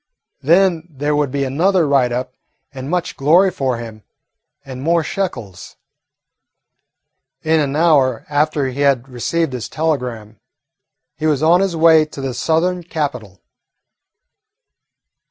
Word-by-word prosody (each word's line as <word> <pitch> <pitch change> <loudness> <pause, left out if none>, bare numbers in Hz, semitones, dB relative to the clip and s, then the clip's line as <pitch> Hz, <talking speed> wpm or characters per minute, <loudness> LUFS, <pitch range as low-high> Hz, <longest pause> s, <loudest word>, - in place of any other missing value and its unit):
Then 170 +1 +2
there 145 0 -2
would 145 -2 0
be 140 +1 -2
another 165 +6 +1
write 135 -3 +2
up 125 +1 -4 0.4
and 135 +1 -7
much 180 0 -2
glory 170 +7 +4
for 130 -6 -2
him 115 -2 -9 0.6
and 130 -1 -8
more 165 +3 +1
shekels. 120 - -5 1.7
In 160 0 +2
an 145 -2 -1
hour 150 -5 +2
after 150 -1 0
he 130 +1 -5
had 135 -3 +2
received 135 +4 -2
his 125 -3 -5
telegram 125 -9 -3 0.8
he 155 - -1
was 150 -1 0
on 170 +3 +4
his 195 -3 -1
way 160 -1 +5
to 150 - -11
the 135 -2 -3
Southern 175 +6 0
capital. 140 - -5
145 Hz, 130 wpm, -18 LUFS, 130-165 Hz, 1.7 s, way